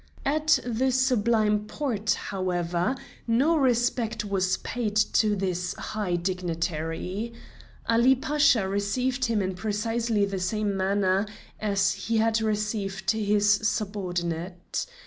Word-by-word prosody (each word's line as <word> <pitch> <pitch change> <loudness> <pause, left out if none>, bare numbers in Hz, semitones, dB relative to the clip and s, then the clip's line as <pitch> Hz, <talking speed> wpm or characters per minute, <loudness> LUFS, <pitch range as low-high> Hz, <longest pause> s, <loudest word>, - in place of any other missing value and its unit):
At 310 +2 +3
the 250 +2 +1
Sublime 225 -5 +2
Porte, 220 -6 -1
however, 180 +2 -1 0.3
no 265 +9 +3
respect 240 -5 +1
was 190 -2 +1
paid 225 -4 -3
to 215 0 +3
this 180 -2 -2
high 205 -5 -2
dignitary. 175 +3 -3 0.5
Ali 235 +3 +5
Pasha 280 -5 +3
received 245 +7 0
him 225 -4 +1
in 185 0 -2
precisely 215 +2 0
the 195 -1 -3
same 205 +2 -1
manner 195 +1 +1 0.3
as 200 -1 +2
he 230 0 -2
had 225 0 +2
received 210 -1 -1
his 210 -1 +1
subordinate. 185 - -1
210 Hz, 110 wpm, -26 LUFS, 190-230 Hz, 0.5 s, Ali